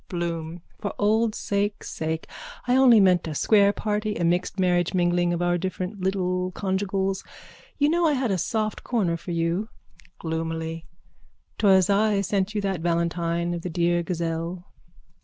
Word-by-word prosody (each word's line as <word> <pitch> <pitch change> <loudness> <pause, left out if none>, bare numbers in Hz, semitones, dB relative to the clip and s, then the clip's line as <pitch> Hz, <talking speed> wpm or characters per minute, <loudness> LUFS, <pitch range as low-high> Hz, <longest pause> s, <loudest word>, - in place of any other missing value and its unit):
BLOOM: 170 -1 -4 0.2
For 205 - -4
old 215 +1 +2
sake' 205 +1 -2
sake. 160 0 -4 0.4
I 250 - +3
only 255 -4 +7
meant 180 -4 +4
a 155 - -4
square 200 +4 +4
party, 210 0 -2
a 175 - -2
mixed 175 +3 0
marriage 180 0 +2
mingling 175 0 +2
of 175 0 -1
our 175 0 +1
different 185 +2 -4
little 185 -1 0
conjugials. 195 0 -1 0.5
You 290 - +3
know 340 +1 +3
I 300 - +3
had 255 -5 0
a 190 - 0
soft 215 +4 -2
corner 200 -9 0
for 165 +1 -9
you. 170 +5 -1 0.5
(Gloomily.) 160 0 -4 0.7
'Twas 190 -3 +5
I 205 0 +2
sent 200 +1 -1
you 210 - 0
that 195 -4 -2
valentine 170 0 0
of 170 - -4
the 180 - -4
dear 175 0 +1
gazelle. 170 +1 -3
185 Hz, 160 wpm, -25 LUFS, 170-205 Hz, 0.7 s, only